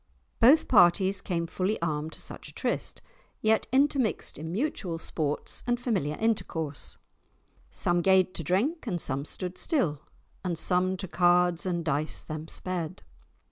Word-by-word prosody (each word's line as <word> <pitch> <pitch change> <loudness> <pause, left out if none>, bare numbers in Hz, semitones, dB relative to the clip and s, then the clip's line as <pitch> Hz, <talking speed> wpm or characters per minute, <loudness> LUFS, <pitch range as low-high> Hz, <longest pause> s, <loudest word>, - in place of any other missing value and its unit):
Both 285 +7 +6
parties 190 -1 +4
came 170 -4 -2
fully 185 +5 -1
armed 155 -1 -2
to - - -8
such - - -5
a - - -14
tryst, - - -2 0.4
yet 220 0 +2
intermixed 270 - +1
in 160 +1 -5
mutual 195 - -2
sports 150 -2 -3
and 240 0 +1
familiar 190 - -1
intercourse, 160 -9 -2 0.7
"Some 175 0 +1
gaed 190 0 +4
to 165 - -1
drink, 235 - 0
and 180 -5 -1
some 140 -2 -1
stood 180 +3 -5
still, 195 - 0 0.4
And 175 -3 -2
some 185 +2 +2
to 190 - -5
cards 175 0 +3
and 170 -2 -1
dice 150 0 -1
them 155 +1 -6
sped." 180 0 -4
180 Hz, 145 wpm, -28 LUFS, 160-210 Hz, 0.7 s, Both